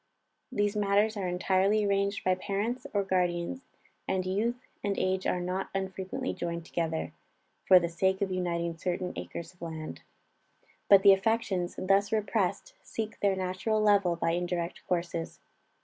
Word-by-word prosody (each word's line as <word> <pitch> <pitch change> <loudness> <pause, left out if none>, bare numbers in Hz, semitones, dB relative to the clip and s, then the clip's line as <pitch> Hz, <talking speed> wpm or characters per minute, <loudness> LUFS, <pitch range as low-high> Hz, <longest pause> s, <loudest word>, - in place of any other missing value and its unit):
These 205 -3 0
matters 205 +1 +2
are 195 -3 -2
entirely 190 +4 +2
arranged 200 0 0
by 185 - +3
parents 205 +7 -2
and 200 -2 0
guardians, 180 +7 -1 0.4
and 190 -1 0
youth 230 +7 -1 0.2
and 200 -1 -1
age 185 0 0
are 180 - +1
not 180 +2 -2
unfrequently 190 +6 -3
joined 170 -1 -4
together, 165 -2 -2 0.5
for 185 - +9
the 170 - -1
sake 190 +3 +1
of 190 - -2
uniting 170 -2 -1
certain 180 0 -2
acres 170 +1 -6
of 180 - -31
land. 160 -2 -6 0.9
But 195 -1 +8
the 200 -1 +9
affections, 195 -3 0
thus 195 +3 +2
repressed, 220 - 0
seek 220 -1 -5
their 200 -1 +2
natural 185 +4 -1
level 200 -4 +4
by 165 0 0
indirect 175 0 -2
courses. 170 -2 -2
190 Hz, 150 wpm, -29 LUFS, 175-205 Hz, 0.9 s, for